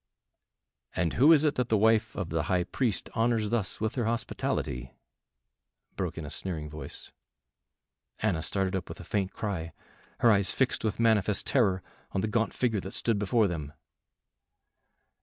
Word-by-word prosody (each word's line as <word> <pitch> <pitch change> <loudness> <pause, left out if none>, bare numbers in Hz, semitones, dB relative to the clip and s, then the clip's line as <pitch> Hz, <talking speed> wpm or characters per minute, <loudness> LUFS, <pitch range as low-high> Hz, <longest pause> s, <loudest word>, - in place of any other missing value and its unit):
"And 85 -3 0
who 145 +6 +6
is 155 -2 +6
it 150 -2 +3
that 125 - -3
the 110 - +4
wife 110 +1 +3
of 95 -4 -3
the 80 0 0
High 90 -1 +2
Priest 110 +3 -1
honors 115 -2 +1
thus 110 -6 -1
with 110 +1 -1
her 120 -4 -1
hospitality?" 65 - -2 1.0
broke - - -3
in - - -5
a - - -6
sneering 80 -5 -4
voice. 75 - -8 1.1
Anna 100 -7 0
started 95 +3 0
up 95 - -4
with - - -8
a - - -8
faint 100 -2 -1
cry, 85 -6 -4 0.5
her 115 - +6
eyes 100 -2 +3
fixed 130 - 0
with 110 -1 -1
manifest 110 -3 +3
terror 100 -9 +2 0.3
on 95 - 0
the 110 - 0
gaunt 110 0 +1
figure 115 -5 0
that 95 +1 -7
stood 115 -3 +1
before 105 +2 +3
them. 75 -5 -5
105 Hz, 165 wpm, -29 LUFS, 95-115 Hz, 1.1 s, who